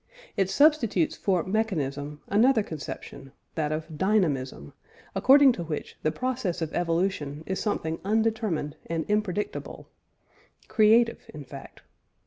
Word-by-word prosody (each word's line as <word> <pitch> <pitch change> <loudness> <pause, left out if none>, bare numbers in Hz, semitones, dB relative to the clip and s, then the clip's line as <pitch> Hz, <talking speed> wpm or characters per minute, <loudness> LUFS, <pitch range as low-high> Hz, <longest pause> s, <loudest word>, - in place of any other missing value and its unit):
It 195 -1 +1
substitutes 235 - +3
for 185 -4 0
"mechanism" 150 -9 -2
another 225 +2 +4
conception 140 -4 -8 0.2
that 155 -2 -1
of 155 0 -5
"dynamism," 145 - 0 0.4
according 275 +1 +6
to 180 -8 -4
which 155 -2 -5
the 155 - +1
process 245 -4 -2
of 160 -2 -3
evolution 165 -4 -1
is 190 - -2
something 165 -6 -2
undetermined 215 -8 0
and 165 -1 -2
impredictable 210 -1 -2 0.8
"creative," 230 +1 +3
in 145 -2 -8
fact. 135 +1 -11
180 Hz, 115 wpm, -27 LUFS, 155-220 Hz, 0.8 s, according